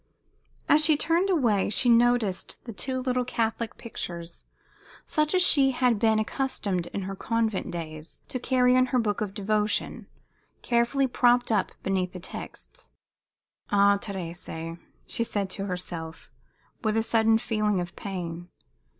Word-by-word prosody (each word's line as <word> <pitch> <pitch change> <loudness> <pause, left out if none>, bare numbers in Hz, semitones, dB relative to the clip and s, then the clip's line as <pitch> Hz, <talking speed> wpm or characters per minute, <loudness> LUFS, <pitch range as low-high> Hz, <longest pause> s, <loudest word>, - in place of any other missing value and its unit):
As 305 +1 +5
she 305 -1 +4
turned 335 +5 +1
away 240 - +2
she 220 +4 +1
noticed 235 -5 +2 0.2
two 260 +4 -2
little 255 -1 0
Catholic 230 -2 -2
pictures, 170 -7 -6 0.6
such 305 +3 +1
as 365 - +5
she 275 -6 +5
had 245 -3 +2
been 220 -1 +3
accustomed 215 -6 -1
in 200 - -4
her 195 +1 -5
convent 225 -1 -1
days 155 -2 -7
to 255 - -4
carry 250 0 +3
in 255 0 +4
her 255 - 0
books 220 -4 0
of 205 -2 -3
devotion, 210 0 -1 0.6
carefully 240 +3 +2
propped 245 -1 +3
up 205 -4 +1
beneath 185 -2 -1
the 180 - -7
texts. 485 - -9 0.8
"Ah, 200 0 +4
Thérèse!" 170 -3 -6 0.3
she 230 - -1
said 200 -4 -2
to 195 0 -3
herself, 170 -3 -6 0.5
with 220 0 +1
a 225 - +2
sudden 225 -1 +3
feeling 215 -4 0
of 175 0 -5
pain. 175 -3 -6
220 Hz, 140 wpm, -27 LUFS, 190-250 Hz, 0.8 s, As